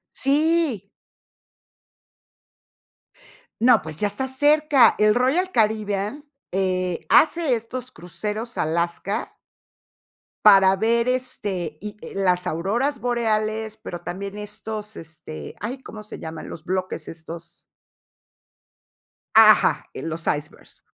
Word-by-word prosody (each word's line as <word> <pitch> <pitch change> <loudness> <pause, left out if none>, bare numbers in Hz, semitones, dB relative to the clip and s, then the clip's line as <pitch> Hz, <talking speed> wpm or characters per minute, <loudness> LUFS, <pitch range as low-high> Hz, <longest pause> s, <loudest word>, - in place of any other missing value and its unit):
Sí. 290 - +1 2.7
No, 240 -4 +6
pues, 160 -1 -7
ya 205 - +1
estás 260 +6 -3
cerca, 295 -5 +5
el 210 0 +4
Royal 275 +10 +2
Caribbean, 215 - 0 0.3
eh, 185 -2 -1
hace 320 -5 +4
estos 245 +2 -6
cruceros 210 +6 -5
a - - +1
Alaska 170 +5 -2 1.1
para 195 -2 +7
ver, 230 +4 +1
este, 205 -11 -2
y, 210 0 -7
eh, - - -9
las 180 -2 +1
auroras 230 - -1
boreales, 220 -2 -1
pero 175 -5 -7
también 195 +4 -6
estos, 210 0 -6
este, 150 - -9
ay, 255 +5 -5
¿cómo 215 -4 -10
se 215 - -9
llaman?, 160 0 -7
los 160 - -9
bloques 185 -3 -3
estos 165 +1 -10 1.7
Ajá, - - +6
eh, - - -7
los 165 +2 -4
icebergs, 150 0 -4
210 Hz, 110 wpm, -23 LUFS, 180-245 Hz, 2.7 s, para